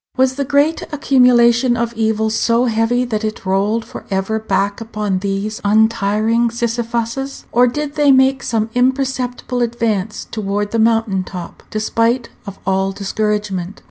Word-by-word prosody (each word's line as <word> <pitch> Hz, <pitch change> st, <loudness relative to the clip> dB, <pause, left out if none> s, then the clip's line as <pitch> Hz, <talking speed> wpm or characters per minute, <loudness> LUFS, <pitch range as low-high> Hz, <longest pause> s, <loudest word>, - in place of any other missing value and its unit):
Was 260 Hz, 0 st, +3 dB
the 280 Hz, +1 st, -2 dB
great 290 Hz, +4 st, +2 dB
accumulation 250 Hz, -3 st, +4 dB
of 235 Hz, 0 st, -1 dB
evil 220 Hz, -1 st, 0 dB
so 230 Hz, +2 st, +2 dB
heavy 235 Hz, +2 st, +1 dB
that 220 Hz, -3 st, -3 dB
it 215 Hz, -2 st, -4 dB
rolled 205 Hz, +4 st, 0 dB
for -, -, -10 dB
ever 195 Hz, +3 st, -1 dB
back 200 Hz, 0 st, -1 dB
upon 210 Hz, -4 st, -2 dB
these 200 Hz, +2 st, -3 dB
untiring 220 Hz, +2 st, +2 dB
Sisyphuses? 235 Hz, +3 st, -3 dB
Or 245 Hz, +1 st, +4 dB
did 290 Hz, +4 st, -3 dB
they 295 Hz, -2 st, +4 dB
make 265 Hz, 0 st, +4 dB
some 225 Hz, -1 st, -1 dB
imperceptible 255 Hz, -1 st, -1 dB
advance 225 Hz, -3 st, -1 dB
toward 205 Hz, -1 st, -2 dB
the 230 Hz, -, 0 dB
mountain 225 Hz, -4 st, +2 dB
top, 180 Hz, -2 st, -8 dB
despite 230 Hz, +3 st, 0 dB, 0.2 s
of 200 Hz, -, -7 dB
all 190 Hz, 0 st, +1 dB
discouragement? 200 Hz, -2 st, -2 dB
225 Hz, 140 wpm, -17 LUFS, 210-245 Hz, 0.2 s, accumulation